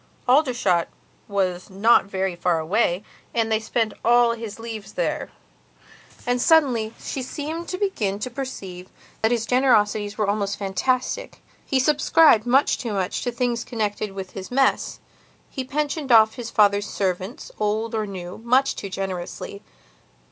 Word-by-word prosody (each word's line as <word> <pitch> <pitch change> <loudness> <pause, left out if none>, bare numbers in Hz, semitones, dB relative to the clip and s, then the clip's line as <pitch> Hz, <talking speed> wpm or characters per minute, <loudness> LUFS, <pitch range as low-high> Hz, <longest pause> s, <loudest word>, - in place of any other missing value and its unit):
Aldershot 245 - +3 0.4
was 185 -3 -1
not 200 +4 +4
very 190 -2 -2
far 175 -1 +1
away, 175 +3 +1 0.3
and 225 -1 +1
they 220 - +3
spent 220 0 -1
all 240 0 +5
his 225 -3 -6
leaves 220 -3 -7
there. - - -2 1.0
And, 245 0 +1
suddenly, 250 -9 +3
she 270 - -4
seemed 310 +6 -5
to 365 - -3
begin 225 - -1
to 250 +5 -5
perceive 195 -9 -7 0.3
that 220 - +3
his 235 -1 0
generosities 215 -5 +2
were 210 -2 0
almost 200 -1 -1
fantastic. 255 - -2 0.2
He 270 - 0
subscribed 295 -3 +4
much 270 +4 +3
too 230 -4 -3
much 190 -1 -1
to 245 - -1
things 235 -1 -1
connected 210 -3 -3
with 190 -1 -7
his 190 -1 -7
mess, 270 +1 +1 0.5
he 265 - -4
pensioned 290 +1 -2
off 220 -1 +7
his 240 -2 -6
father's 205 -1 +3
servants, 190 +3 -3
old 215 +2 -1
or 215 -1 -1
new, 180 -2 -7
much 255 +4 +2
too 200 - -6
generously. 190 +1 -5
220 Hz, 150 wpm, -23 LUFS, 200-250 Hz, 1.0 s, off